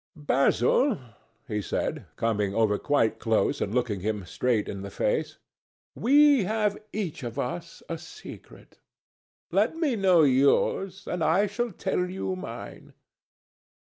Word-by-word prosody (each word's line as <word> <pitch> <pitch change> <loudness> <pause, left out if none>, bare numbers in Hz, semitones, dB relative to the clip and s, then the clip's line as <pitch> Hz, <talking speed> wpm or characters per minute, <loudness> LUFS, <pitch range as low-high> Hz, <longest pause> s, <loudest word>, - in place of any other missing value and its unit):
"Basil," 150 - +2 0.5
he 105 -4 -2
said, - - -3
coming 105 -3 0
over 110 -2 +2
quite 115 -6 +1
close 110 -4 +1
and 100 - -1
looking 120 -6 0
him 105 0 -3
straight 115 +2 0
in 100 - -5
the 100 - -6
face, - - -1 0.6
"we 285 0 +5
have 210 0 0 0.2
each 195 -7 -4
of 120 -2 -6
us 165 +6 -5
a 165 -1 -4
secret. 435 - -13 0.7
Let - - +2
me 315 -7 0
know 185 -5 +4
yours, 145 +8 +2
and 175 -2 -2
I 165 +7 +3
shall 220 +4 -2
tell 180 0 -2
you 190 0 -3
mine. 185 +2 -9
160 Hz, 135 wpm, -27 LUFS, -, 0.7 s, we